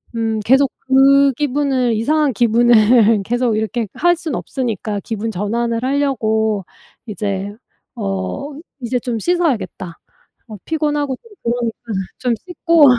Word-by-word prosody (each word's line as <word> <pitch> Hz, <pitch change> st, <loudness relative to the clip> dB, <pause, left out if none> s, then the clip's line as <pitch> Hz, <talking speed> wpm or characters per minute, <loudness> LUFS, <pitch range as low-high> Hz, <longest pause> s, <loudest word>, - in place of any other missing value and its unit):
음 225 Hz, -1 st, -1 dB
계속 270 Hz, +2 st, +4 dB, 0.2 s
그 275 Hz, +1 st, +5 dB
기분을 265 Hz, -3 st, 0 dB
이상한 295 Hz, +5 st, +1 dB
기분을 230 Hz, -1 st, +4 dB
계속 240 Hz, +1 st, 0 dB
이렇게 220 Hz, +1 st, -2 dB
할 350 Hz, 0 st, +3 dB
순 320 Hz, -6 st, -4 dB
없으니까 220 Hz, -6 st, -3 dB
기분 225 Hz, 0 st, -3 dB
전환을 230 Hz, +4 st, -2 dB
하려고 220 Hz, -7 st, 0 dB, 0.4 s
이제 200 Hz, -2 st, -3 dB, 0.4 s
어 95 Hz, -, -3 dB, 0.3 s
'이제 245 Hz, +1 st, -1 dB
좀 235 Hz, -2 st, -3 dB
씻어야겠다. 220 Hz, -, -1 dB, 0.5 s
어 215 Hz, -2 st, -9 dB
피곤하고 295 Hz, -4 st, -1 dB
좀 460 Hz, -, -21 dB
그러니까 235 Hz, -1 st, -1 dB, 0.5 s
좀 245 Hz, -2 st, 0 dB
씻고 335 Hz, +1 st, +3 dB
240 Hz, 260 characters per minute, -18 LUFS, 220-275 Hz, 0.5 s, 그